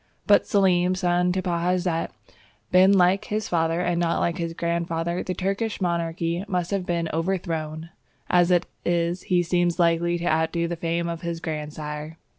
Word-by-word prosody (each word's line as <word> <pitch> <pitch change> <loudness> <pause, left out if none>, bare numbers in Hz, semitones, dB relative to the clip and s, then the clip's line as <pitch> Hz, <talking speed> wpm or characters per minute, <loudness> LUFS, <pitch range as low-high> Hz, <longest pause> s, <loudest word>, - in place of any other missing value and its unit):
But - - +6
had - - -24
Selim, 185 -4 +3
son 180 0 +1
to 185 0 -2
Bajazet, 175 -1 0 0.6
been 185 +2 +6
like 190 +1 +4
his 215 0 -2
father, 165 0 +1
and 175 -1 0
not 170 -1 +1
like 170 +1 -1
his 165 -1 -3
grandfather, 170 0 -1
the 185 - -4
Turkish 195 +4 -2
monarchy 170 -1 -1
must 180 -2 -2
have 195 -2 -1
been 170 -1 0
overthrown; 165 -2 -3 0.4
as 175 -1 +3
it 175 -1 +3 0.2
is, 175 +1 0
he 180 -1 +3
seems 175 -1 +1
likely 170 0 +2
to 170 - -5
outdo 160 +1 +1
the 170 - -3
fame 170 +1 -2
of 170 -1 -4
his 170 -1 -4
grandsire. 150 0 -5
170 Hz, 170 wpm, -24 LUFS, 165-180 Hz, 0.6 s, But